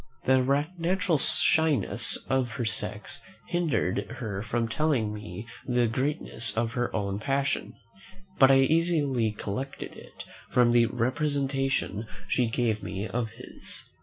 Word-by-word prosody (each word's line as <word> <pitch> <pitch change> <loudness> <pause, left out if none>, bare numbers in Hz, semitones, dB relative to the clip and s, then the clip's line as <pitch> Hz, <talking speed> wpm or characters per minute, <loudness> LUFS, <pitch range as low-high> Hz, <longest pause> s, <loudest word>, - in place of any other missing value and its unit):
The 130 +2 +3
natural 175 -2 +1
shyness 140 -8 +3
of 130 -3 0
her 120 -1 -2
sex 110 - -4 0.3
hindered 130 - 0
her 100 -6 -4
from 115 +2 -1
telling 120 -4 0
me 105 0 -7 0.2
the 125 -1 +3
greatness 115 -3 -2
of 115 0 +1
her 120 -1 -1
own 100 -1 -1
passion; 140 +3 -1 0.7
but 135 - +8
I 135 0 +6
easily 145 -6 +2
collected 105 +6 -5
it - - -11 0.3
from 125 -1 +4
the 120 -1 +5
representation 135 - -1 0.2
she 125 -2 +2
gave 115 -2 0
me 100 +3 -4
of 120 -1 -2
his. 115 +3 -10
125 Hz, 130 wpm, -28 LUFS, 110-140 Hz, 0.7 s, but